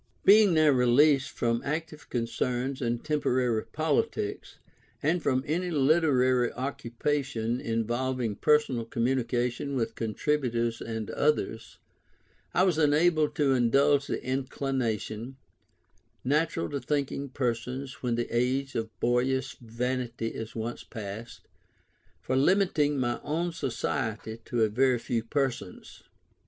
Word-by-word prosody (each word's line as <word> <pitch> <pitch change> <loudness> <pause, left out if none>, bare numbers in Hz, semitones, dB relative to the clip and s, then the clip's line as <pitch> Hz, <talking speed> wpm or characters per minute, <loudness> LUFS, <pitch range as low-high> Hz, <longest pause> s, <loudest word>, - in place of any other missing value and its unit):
Being 205 -3 +7
now 155 -1 +5
released 135 +2 +4
from 115 0 -1
any 150 - 0
active 160 -1 -8
concern 125 +2 -1
in 120 -1 0
temporary 125 -7 +1
politics, 150 -9 -1 0.5
and 165 +4 +2
from 130 -3 +1
any 175 +4 -1
literary 135 -5 +3
occupation 125 -2 -2
involving 120 0 -1
personal 150 -6 +2
communication 125 +2 -1
with 115 -3 -1
contributors 120 0 -1
and 110 -2 -4
others, 115 -6 -1 0.7
I 180 - +3
was 180 -4 +2
enabled 155 +1 +3
to 140 -3 +3
indulge 140 +3 +3
the - - -3
inclination, 130 -3 -2 0.9
natural 145 - +1
to 140 - -2
thinking 140 +1 -2
persons 125 +1 -3
when 120 -2 0
the 120 0 -1
age 130 +3 0
of 110 -1 -2
boyish 130 +2 +1
vanity 120 0 -3
is 110 0 -7
once 115 +1 -4
past, 110 +1 -8 0.8
for 130 - -1
limiting 150 -1 +3
my 120 -1 0
own 170 +4 -1
society 115 -6 -3
to 120 -2 +1
a - - +4
very 125 +4 +2
few 115 0 -2
persons. 125 -7 -3
130 Hz, 120 wpm, -28 LUFS, 115-145 Hz, 0.9 s, Being